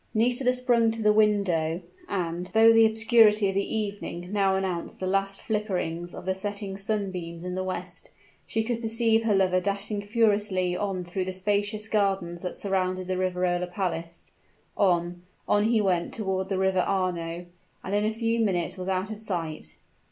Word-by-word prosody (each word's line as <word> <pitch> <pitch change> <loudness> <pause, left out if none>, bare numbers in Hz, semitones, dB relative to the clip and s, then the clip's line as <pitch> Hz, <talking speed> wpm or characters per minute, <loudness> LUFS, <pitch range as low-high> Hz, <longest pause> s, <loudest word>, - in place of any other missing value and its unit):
Nisida 245 +3 +3
sprung 245 -2 +2
to 225 0 -3
the 210 0 +5
window; 195 -7 +2 0.3
and, 175 -2 -2
though 225 +1 +7
the 225 0 +7
obscurity 220 -2 +4
of - - -2
the 200 +3 -1
evening 200 -4 -4
now 195 -2 +2
announced 190 -3 -3
the 185 - -3
last 195 +1 -1
flickerings 180 -6 -2
of - - -9
the 190 - +1
setting 200 0 -4
sunbeams 190 -5 -4
in 180 0 -4
the 185 +1 -2
west, 185 0 -5 0.4
she 225 - 0
could 235 0 -2
perceive 225 0 +2
her 210 -3 +3
lover 185 -1 +3
dashing 200 +2 -2
furiously 205 -4 +1
on 190 -1 -2
through 180 +2 -3
the 185 - -4
spacious 205 +3 0
gardens 195 -5 0
that 180 - -4
surrounded 185 -2 -1
the 185 - -1
Riverola 180 -1 0
Palace. 175 -2 -4 0.4
On 175 -2 +1 0.3
on 205 0 +3
he 225 0 +3
went 185 -4 0
toward 190 -3 -2
the 195 - 0
River 190 0 +2
Arno; 175 -2 -1 0.4
and 190 - -4
in 205 0 +2
a 215 - +1
few 230 +1 -1
minutes 185 -4 0
was 185 - -5
out 190 +2 -1
of 215 - -6
sight. 170 -7 -4
195 Hz, 175 wpm, -26 LUFS, 180-215 Hz, 0.4 s, though